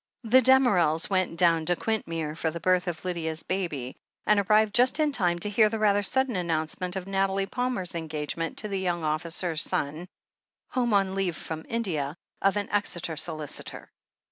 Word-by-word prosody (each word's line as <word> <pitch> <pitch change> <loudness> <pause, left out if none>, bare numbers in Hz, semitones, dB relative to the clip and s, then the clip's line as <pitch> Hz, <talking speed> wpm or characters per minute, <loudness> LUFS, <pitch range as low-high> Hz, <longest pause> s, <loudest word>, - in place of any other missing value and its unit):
The 245 +3 +5
Damerels 205 - +4
went 185 -3 0
down 165 -3 +3
to 175 - +3
Quintmere 165 -8 -2
for 160 - -1
the 170 +2 -5
birth 185 +1 +2
of 170 0 -4
Lydia's 160 -3 -3
baby, 155 -10 -3 0.3
and 210 -1 +4
arrived 215 +1 +3
just 255 +5 +3
in 305 -1 +3
time 175 -9 +1
to 190 +4 -1
hear 215 +1 +5
the 225 - -2
rather 205 -1 +3
sudden 260 +3 +1
announcement 170 +1 -2
of 190 -1 -4
Nathalie 195 0 0
Palmer's 245 -5 -2
engagement 160 0 -4
to 215 - -1
the 195 -2 -2
young 175 -3 -1
officer 165 +2 -1
son, 155 +2 -2 0.6
home 240 -4 +1
on 195 -1 +2
leave 190 -3 -1
from 160 -1 -6
India, 165 -11 -2 0.3
of 195 +1 +2
an 205 - -2
Exeter 175 -5 -1
solicitor. 155 -1 -5
185 Hz, 170 wpm, -27 LUFS, 165-205 Hz, 0.6 s, The